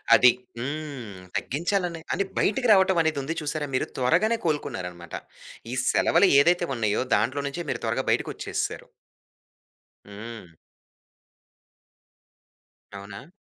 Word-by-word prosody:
అది. 125 Hz, -, +7 dB, 0.3 s
హ్మ్. 135 Hz, -7 st, -5 dB, 0.2 s
తగ్గించాలని 175 Hz, +3 st, -1 dB
అని 195 Hz, -, +1 dB, 0.2 s
బయటికి 245 Hz, +5 st, +1 dB
రావటం 190 Hz, -2 st, +4 dB
అనేది 160 Hz, -2 st, 0 dB
ఉంది 160 Hz, +5 st, -3 dB
చూసారా 150 Hz, 0 st, -2 dB
మీరు? -, -, 0 dB
త్వరగానే 175 Hz, -, +3 dB
కోలుకున్నారన్నమాట. 90 Hz, -, -3 dB, 0.6 s
ఈ -, -, -2 dB
సెలవులు 200 Hz, -, +4 dB
ఏదైతే 175 Hz, +4 st, +3 dB
ఉన్నాయో 110 Hz, -1 st, 0 dB
దాంట్లో 140 Hz, +3 st, 0 dB
నుంచే 165 Hz, +5 st, -4 dB
మీరు -, -, -2 dB
త్వరగా -, -, -1 dB
బయటికోచ్చేసారు. -, -, -2 dB, 1.2 s
హ్మ్. 105 Hz, -1 st, -9 dB, 2.5 s
అవునా? 100 Hz, +8 st, -10 dB
145 Hz, 105 wpm, -26 LUFS, 115-175 Hz, 2.5 s, అది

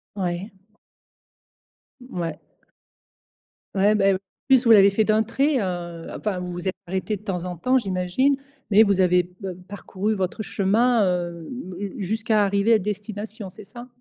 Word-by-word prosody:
Oui. 185 Hz, +1 st, -3 dB, 1.5 s
Ouais. 175 Hz, -10 st, -5 dB, 1.4 s
Ouais, 200 Hz, +2 st, +4 dB
bah, 195 Hz, -1 st, +4 dB
en -, -, 0 dB, 0.3 s
plus, 260 Hz, -2 st, +5 dB
vous 230 Hz, -, +4 dB
l'avez 200 Hz, -2 st, +8 dB
fait 200 Hz, +2 st, +2 dB
d'un 215 Hz, +1 st, +3 dB
trait, 270 Hz, +6 st, +1 dB
heu, 175 Hz, -3 st, -4 dB
enfin, 205 Hz, -4 st, -2 dB
vous 180 Hz, 0 st, -5 dB
vous 175 Hz, +1 st, -5 dB
êtes 190 Hz, -, 0 dB
arrêtés 190 Hz, +4 st, -2 dB
de -, -, -21 dB
temps 180 Hz, -4 st, -3 dB
en 180 Hz, -1 st, -5 dB
temps 255 Hz, +10 st, +2 dB
j'imagine, 195 Hz, +6 st, +1 dB, 0.4 s
mais 210 Hz, +2 st, +7 dB
vous 200 Hz, -3 st, +2 dB
avez 180 Hz, -1 st, +4 dB
p 180 Hz, -, -21 dB, 0.3 s
parcouru 205 Hz, +1 st, -3 dB
votre 190 Hz, +1 st, -2 dB
chemin, 220 Hz, +4 st, +2 dB
heu, 175 Hz, -2 st, -2 dB, 0.3 s
j 200 Hz, 0 st, -4 dB
jusqu'à 220 Hz, +1 st, +1 dB
arriver 200 Hz, +3 st, +2 dB
à 220 Hz, -, +5 dB
destination, 205 Hz, +1 st, -5 dB
c'est 185 Hz, -, -12 dB
ça? 240 Hz, +4 st, -10 dB
200 Hz, 160 wpm, -23 LUFS, 180-220 Hz, 1.5 s, l'avez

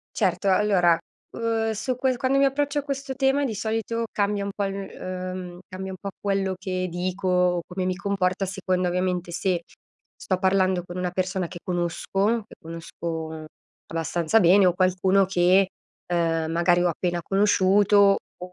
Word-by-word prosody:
Certo, 200 Hz, -, +1 dB
allora, 185 Hz, -4 st, +4 dB, 0.3 s
uhm, 225 Hz, -1 st, -1 dB
su 220 Hz, +4 st, -2 dB
ques 255 Hz, 0 st, 0 dB
quando 260 Hz, +2 st, +1 dB
mi 275 Hz, -, +4 dB
approccio 285 Hz, +1 st, +1 dB
a -, -, -10 dB
questo 275 Hz, -1 st, -4 dB
tema, 270 Hz, +1 st, +2 dB
di 225 Hz, -, -3 dB
solito 225 Hz, +2 st, -2 dB
cambia 205 Hz, 0 st, 0 dB
un 200 Hz, -, -3 dB
po' 205 Hz, -, -1 dB
cambia 195 Hz, 0 st, -3 dB
il -, -, -12 dB
uhm, 185 Hz, -1 st, -5 dB
cambia 190 Hz, +1 st, -6 dB
un -, -, -7 dB
po' 200 Hz, -, -5 dB
quello 195 Hz, -1 st, 0 dB
che 185 Hz, -1 st, -2 dB
dico, 180 Hz, 0 st, 0 dB
come 185 Hz, 0 st, -3 dB
mi 185 Hz, 0 st, -1 dB
comporto, 195 Hz, -1 st, 0 dB
a -, -, -3 dB
seconda 185 Hz, -1 st, -1 dB
ovviamente, 180 Hz, -1 st, -1 dB
se 175 Hz, 0 st, 0 dB, 0.5 s
sto 185 Hz, -, -2 dB
parlando 190 Hz, -1 st, +2 dB
con 180 Hz, 0 st, -7 dB
una 180 Hz, -1 st, -1 dB
persona 185 Hz, -1 st, -1 dB
che 175 Hz, 0 st, -9 dB
conosco, 195 Hz, +5 st, -1 dB
che -, -, -15 dB
conosco 160 Hz, -1 st, -6 dB, 0.4 s
abbastanza 165 Hz, +3 st, +1 dB
bene 190 Hz, 0 st, +6 dB
o 180 Hz, -, +3 dB
qualcuno 185 Hz, +1 st, +3 dB
che, 185 Hz, +1 st, +3 dB, 0.4 s
uhm, 165 Hz, -2 st, +1 dB
magari 175 Hz, +1 st, +3 dB
ho 175 Hz, -, +3 dB
appena 175 Hz, +1 st, -2 dB
conosciuto, 200 Hz, 0 st, +4 dB, 0.2 s
o 180 Hz, 0 st, -9 dB
185 Hz, 170 wpm, -25 LUFS, 180-205 Hz, 0.5 s, bene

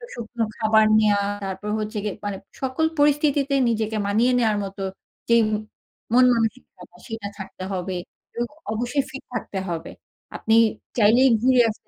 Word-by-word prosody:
শুকনো 230 Hz, 0 st, -3 dB
খাবার 220 Hz, 0 st, +4 dB
নেওয়া, 205 Hz, -2 st, +3 dB, 0.2 s
তারপর 195 Hz, +2 st, -5 dB
হচ্ছে 215 Hz, +1 st, -4 dB
গিয়ে 210 Hz, -, -3 dB
মানে 200 Hz, -2 st, -3 dB, 0.2 s
সকল 265 Hz, +4 st, 0 dB
পরিস্থিতিতে 290 Hz, -1 st, +3 dB
নিজেকে 220 Hz, -1 st, -1 dB
মানিয়ে 230 Hz, +5 st, +3 dB
নেওয়ার 220 Hz, -3 st, +2 dB
মতো 195 Hz, 0 st, -6 dB, 0.5 s
যেই 235 Hz, 0 st, +6 dB, 0.7 s
মন 250 Hz, +1 st, +7 dB
মানসিক 225 Hz, +1 st, 0 dB, 0.4 s
সেটা 225 Hz, -3 st, -5 dB
ছাড়তে 190 Hz, -1 st, -8 dB
হবে, 185 Hz, 0 st, -3 dB, 0.4 s
এবং 240 Hz, 0 st, -1 dB, 0.3 s
অবশ্যই 245 Hz, +5 st, 0 dB
ফিট 270 Hz, -, -8 dB
থাকতে 205 Hz, -5 st, -4 dB
হবে। 165 Hz, -1 st, -4 dB, 0.4 s
আপনি 220 Hz, -, +1 dB, 0.4 s
চাইলেই 240 Hz, +5 st, +5 dB
ঘুরে 255 Hz, 0 st, +5 dB
আসতে। 215 Hz, -, -9 dB
225 Hz, 140 wpm, -23 LUFS, 205-250 Hz, 0.7 s, মন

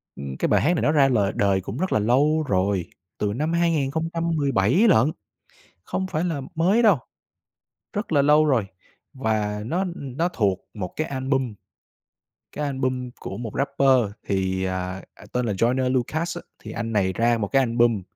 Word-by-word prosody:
ưm, 70 Hz, -1 st, -6 dB
cái -, -, +1 dB
bài -, -, +3 dB
hát 165 Hz, -, +3 dB
này -, -, -1 dB
nó 150 Hz, -, +3 dB
ra 145 Hz, -3 st, +5 dB
lời 105 Hz, -6 st, +2 dB
đời 100 Hz, -1 st, +2 dB
cũng 100 Hz, +5 st, -6 dB
rất 185 Hz, +5 st, -1 dB
là -, -, +3 dB
lâu 145 Hz, +8 st, +3 dB
rồi, 95 Hz, -3 st, +1 dB, 0.3 s
từ 100 Hz, -1 st, -1 dB
năm 155 Hz, +8 st, -1 dB
2017 160 Hz, -, +1 dB
lận, 150 Hz, -, +4 dB, 0.7 s
không 190 Hz, -, -2 dB
phải 170 Hz, -3 st, -2 dB
là 165 Hz, -5 st, -1 dB
mới 190 Hz, +9 st, +3 dB
đâu, 205 Hz, -, +5 dB, 1.0 s
rất 205 Hz, -1 st, -4 dB
là 145 Hz, -3 st, +4 dB
lâu 150 Hz, +2 st, +5 dB
rồi. 130 Hz, -8 st, +2 dB, 0.5 s
Và 105 Hz, -4 st, -1 dB
nó, 165 Hz, +10 st, -1 dB
ưm, 155 Hz, -9 st, -5 dB
nó 170 Hz, +2 st, +1 dB
thuộc 100 Hz, -, 0 dB
một 95 Hz, -5 st, -5 dB
cái 155 Hz, -, -2 dB
album, 130 Hz, -3 st, -1 dB, 1.0 s
cái 150 Hz, -, -3 dB
album 130 Hz, -2 st, -2 dB
của 95 Hz, -, -6 dB
một 115 Hz, -1 st, -5 dB
rapper 135 Hz, -5 st, +2 dB, 0.2 s
thì, 95 Hz, -1 st, 0 dB
à, 95 Hz, 0 st, -3 dB
à, -, -, -16 dB
tên 125 Hz, 0 st, 0 dB
là 105 Hz, -, 0 dB
Joyner 125 Hz, +6 st, +1 dB
Lucas 155 Hz, +7 st, -1 dB
á. -, -, -6 dB, 0.2 s
Thì -, -, -7 dB
anh 115 Hz, -1 st, -4 dB
này 95 Hz, -3 st, +1 dB
ra 120 Hz, +2 st, +2 dB
một 105 Hz, -2 st, -2 dB
cái 135 Hz, -, +3 dB
album 115 Hz, -3 st, +2 dB
130 Hz, 180 wpm, -24 LUFS, 105-155 Hz, 1.0 s, ra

